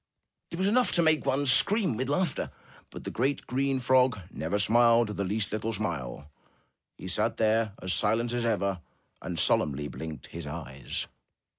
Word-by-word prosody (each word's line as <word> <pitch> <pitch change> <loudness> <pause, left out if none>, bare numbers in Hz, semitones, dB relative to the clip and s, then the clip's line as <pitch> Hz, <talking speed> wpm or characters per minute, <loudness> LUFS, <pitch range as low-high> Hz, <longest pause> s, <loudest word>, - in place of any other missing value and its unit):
It 170 - -6
was 190 - 0
enough 245 +5 +3
to 170 - +4
make 155 -3 +2
one 135 +1 +1
scream 190 - +4
with 130 +4 -3
laughter, 150 +1 0 0.4
but - - -10
the - - -5
great, 135 +4 -1
green 135 +1 0
frog 130 -1 +3
never 80 +6 -2
smiled 115 +1 +4
the 100 -1 -3
least 100 +2 -2
little 110 +2 -2
smile. 75 - -4 0.7
He - - -8
sat 110 +5 -1
there 110 -1 +1
as 95 0 0
silent 115 +3 +1
as 120 -1 -1
ever 100 -6 0 0.4
and 90 -2 -5
solemnly 75 -1 +1
blinked 80 +1 -7
his 85 -3 -8
eyes. 70 -4 -6
110 Hz, 165 wpm, -28 LUFS, 90-130 Hz, 0.7 s, to